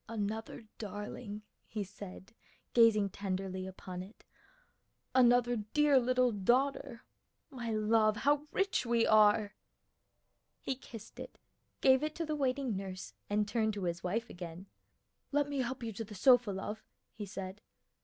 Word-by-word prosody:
"Another 220 +1 -4 0.2
darling," 210 0 -6 0.2
he 215 -2 -3
said 195 +1 -10 0.4
gazing 215 -4 +5
tenderly 190 -1 -3
upon 185 -1 -7
it, 195 +4 -13 0.9
"another 245 -1 +5
dear 280 +6 +3
little 250 0 +2
daughter! 240 +4 +1 0.5
My 240 -4 -5
love, 215 0 +3
how 290 +4 +2
rich 390 0 +1
we 235 -1 +2
are!" 210 -1 +5 1.1
He - - -2
kissed 235 -4 -11
it, - - -8 0.4
gave 265 0 +6
it 305 0 -2
to 335 - -2
the 305 0 -2
waiting 265 -4 0
nurse, 190 -1 -6 0.2
and 210 0 +1
turned 220 -1 0
to 200 - -4
his 170 -1 -2
wife 225 +6 -1
again. 175 -2 -8 0.7
"Let 290 0 +2
me 285 -1 -3
help 255 0 -2
you 225 -1 -4
to 225 - -4
the 210 -1 -10
sofa, 245 +2 +5
love," 205 +3 -4 0.3
he 210 -2 -7
said. 195 0 -7
220 Hz, 145 wpm, -33 LUFS, 200-255 Hz, 1.1 s, gave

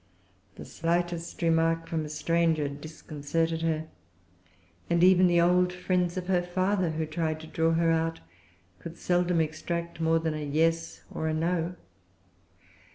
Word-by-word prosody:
The - - -9
slightest 170 0 -2
remark 165 0 +2
from 160 -2 -2
a - - -7
stranger 160 0 +1
disconcerted 155 +2 -3
her; 160 -1 0 1.0
and 170 0 +3
even 185 0 +6
the 175 -1 +3
old 180 +1 +4
friends 180 -1 -1
of 180 - -3
her 180 -1 +2
father 185 +1 0
who 160 0 -2
tried 155 0 -2
to - - -9
draw 165 +1 +1
her 165 0 +2
out 165 0 0 0.6
could 170 0 -9
seldom 175 -1 +1
extract 170 +1 -3
more 165 0 +3
than 160 -1 -1
a 155 -1 -4
Yes 165 +3 0
or 160 - -2
a 155 - 0
No. 170 +2 -1
165 Hz, 150 wpm, -28 LUFS, 160-175 Hz, 1.0 s, even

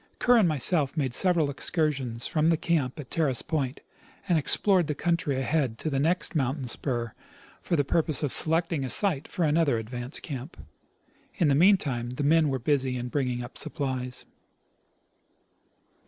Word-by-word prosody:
Kerr 245 -1 +4
and 200 -7 +4
myself 150 0 +3
made 135 -5 -1
several 170 -5 +3
excursions 135 -6 -2
from 155 0 0
the 165 -1 +3
camjD 155 -5 -1
at 130 - -15
Terrace 145 -7 0
point, 140 -4 -3 0.5
and 175 - +2
explored 175 +3 +2
the 150 - -2
country 165 -4 -1
ahead 135 -4 -1
to 155 - -4
the 135 - 0
next 170 +7 0
mountain 135 -3 -1
spur 120 -2 -1 0.5
for 175 - -1
the 145 - +2
purpose 155 0 +2
of 145 - 0
selecting 165 -2 +1
a 130 - -4
site 160 - 0
for 175 - -3
another 150 -4 +2
advance 120 +4 -4
camp. 135 -6 -8 0.8
In 165 - +2
the - - +3
meantime 140 -8 +2
the 125 +4 -4
men 155 +1 +3
were 135 - -1
busy 130 0 0
in 125 0 -5
bring 135 -1 -1
ing 120 0 -3
up 120 - -10
supplies. 130 -2 -4
145 Hz, 170 wpm, -26 LUFS, 130-165 Hz, 0.8 s, Kerr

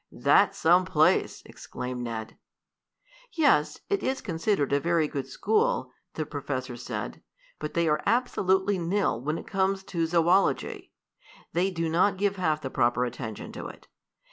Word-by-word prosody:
"That's - - +3
some 175 +3 +4
place!" 160 -4 +2
exclaimed 125 0 -6
Ned. 115 -2 -5 1.0
"Yes, 315 -4 +2
it 400 -1 0
is 265 0 -1
considered 165 -5 -1
a 140 - +4
very 165 0 +1
good 140 -2 -4
school," 470 +3 0 0.2
the - - -2
professor - - -4
said, - - -6 0.4
"but 150 - -5
they 170 -1 +2
are 150 -1 +1
absolutely 200 -4 +1
nil 175 - 0
when 155 +5 -2
it - - -8
comes 195 -1 0
to 170 -3 -2
zoology. 175 +3 +1 0.6
They 180 +3 +2
do 165 -3 -2
not 180 +5 +2
give 200 0 0
half 155 -4 0
the 130 - -5
proper 120 +1 +2
attention 115 -3 -6
to - - -7
it. - - -13
170 Hz, 150 wpm, -27 LUFS, 150-195 Hz, 1.0 s, some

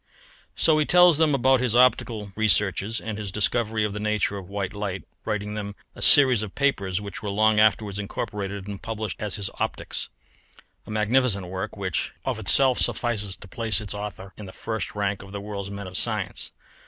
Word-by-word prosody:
So 155 -2 +3
he 150 - +2
tells 175 -3 +6
them 155 -3 +3
about 130 0 +3
his 125 -3 +1
optical 115 -4 +2
researches 105 +1 +1
and 110 -1 -6
his 100 -3 -5
discovery 110 +2 0
of 105 -1 -2
the 105 - -5
nature 105 -1 0
of 95 -2 -8
white 100 -2 -3
light, 100 -2 -4 0.2
writing 105 -1 -3
them 100 -1 -5 0.2
a - - -12
series 130 -6 +6
of 105 -3 -7
papers 100 -10 0
which 100 -1 -7
were 105 - -4
long 110 +1 +3
afterwards 105 -1 +2
incorporated 100 -1 -5
and 100 -1 -7
published 110 -2 -5
as 105 -2 -2
his 100 -2 -3
Optics. - - -3 0.8
A - - -11
magnificent 110 -1 +1
work, 95 +4 -5
which 95 -4 -2
of 130 -4 -2
itself 130 +5 +5
suffices 105 -5 +2
to - - -12
place 110 +2 0
its 105 -4 -4
author 100 -2 -7
in 105 - -9
the 95 - -11
first 110 -1 -4
rank 100 -1 -1
of 95 0 -12
the 100 - -4
world's 100 -1 -6
men 100 0 -7
of 95 0 -9
science. - - 0
105 Hz, 190 wpm, -24 LUFS, 100-110 Hz, 0.8 s, tells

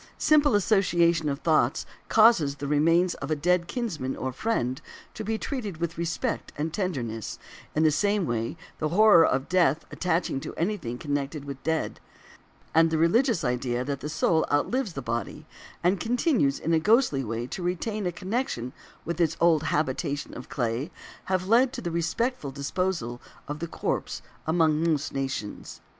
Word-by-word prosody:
Simple 295 -5 +4
association 175 -6 +3
of 140 +1 -3
thoughts 155 -6 +2 0.2
causes 215 -11 +5
the 145 - -6
remains 165 +5 +3
of - - -7
a 155 - +2
dead 175 +3 +1
kinsman 175 - -3
or 130 - -3
friend 135 - -1 0.3
to 220 - -6
be 220 +1 -1
treated 215 - -4
with 170 0 -3
respect 170 +9 -2
and 155 +2 -2
tenderness; 125 - -3 0.4
in 155 - +3
the 155 - +5
same 205 +4 +1
way, 115 +3 -2 0.2
the 155 - 0
horror 200 -1 +7
of 135 -3 +1
death 170 -4 +2
attaching 170 -5 0
to - - -7
anything 170 - -2
connected 145 0 -3
with 140 -1 -6
the - - -2
dead, 160 0 -1 0.7
and 165 0 +5
the 160 - 0
religious 220 - +3
idea 125 0 -1
that 140 0 -3
the 150 - -5
soul 160 +1 +2
outlives 205 - 0
the 135 - -5
body, 120 +6 -4 0.4
and 180 +2 +2
continues 240 - +1
in 165 - -1
a 160 - +4
ghostly 210 - +3
way 115 +1 -3
to 155 - -6
retain 185 +3 -2
a - - 0
connection 185 - -3 0.3
with 170 +1 -2
its 165 0 +1
old 165 -3 +4
habitation 145 -1 -1
of 125 - -9
clay, 120 +4 -2 0.4
have 185 -1 -1
led 245 +4 +4
to 265 - -6
the 175 -7 -4
respectful 170 - -1
disposal 140 -3 -2 0.3
of 145 +1 -5
the 170 - -3
corpse - - -3 0.2
among 160 -1 +2
most 155 -3 0
nations. 135 -6 -4
165 Hz, 170 wpm, -27 LUFS, 140-190 Hz, 0.7 s, horror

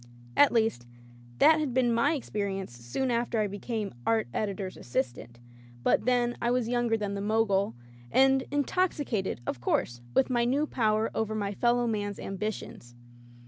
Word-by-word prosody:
At 285 - +6
least, 220 - +1 0.5
that 315 - +6
had 280 -5 -2
been 245 -2 +3
my 280 +7 +2
experience 200 - -4
soon 120 - -2
after 235 -1 0
I 215 - +2
became 205 +1 -4
art 220 - +1
editor's 195 -3 -3
assistant 120 -1 -4 0.2
— 120 0 -21
^but - - +3
then 245 -1 +2
I 235 - +1
was 245 -2 +1
younger 240 -1 +1
than 205 -2 -3
the 200 - -3
Mogul, 205 - +1 0.4
and 265 0 +4
in 290 0 +1
toxicated, 280 - -1
of 125 - -4
course, 120 0 0
with 265 - +3
my 240 -1 +2
new 270 +5 +2
power 220 -5 +1
over 220 -1 -1
my 205 -1 -2
fellow 240 +3 +2
man's 205 -3 -2
ambitions. 195 - -5
220 Hz, 165 wpm, -29 LUFS, 195-245 Hz, 0.5 s, At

